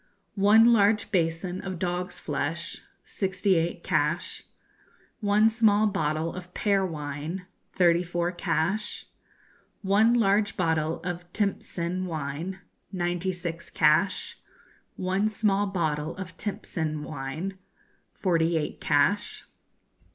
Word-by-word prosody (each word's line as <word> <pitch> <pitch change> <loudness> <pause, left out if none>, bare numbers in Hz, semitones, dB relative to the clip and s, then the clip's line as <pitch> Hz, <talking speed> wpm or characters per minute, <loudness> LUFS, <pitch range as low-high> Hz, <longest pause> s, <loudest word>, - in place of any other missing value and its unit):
One 220 +4 +6
large 210 0 +3
basin 175 0 0
of 190 -2 -5
dog's 180 +1 -3
flesh 160 +5 -3 0.2
sixty 190 0 0
eight 170 0 0
cash. 150 +5 0 0.8
One 210 0 +4
small 215 -2 +4
bottle 160 -5 0
of 180 0 -9
pear 200 -2 +2
wine 155 +1 -4 0.3
thirty 175 -1 +4
four 175 0 -1
cash. 180 +4 -1 0.8
One 210 +5 +4
large 205 -2 +2
bottle 160 -2 0
of 175 0 -5
timtsin 185 -3 -1
wine 160 +4 -4 0.3
ninety 175 0 -1
six 170 -2 -5
cash. 155 +6 +2 0.6
One 190 +3 0
small 205 -1 +1
bottle 160 -4 -1
of 185 -1 -7
timtsin 160 -7 -3
wine 155 +7 -5 0.6
forty 170 -3 +2
eight 150 - -3
cash. 145 +9 +1
180 Hz, 105 wpm, -27 LUFS, 165-200 Hz, 0.8 s, One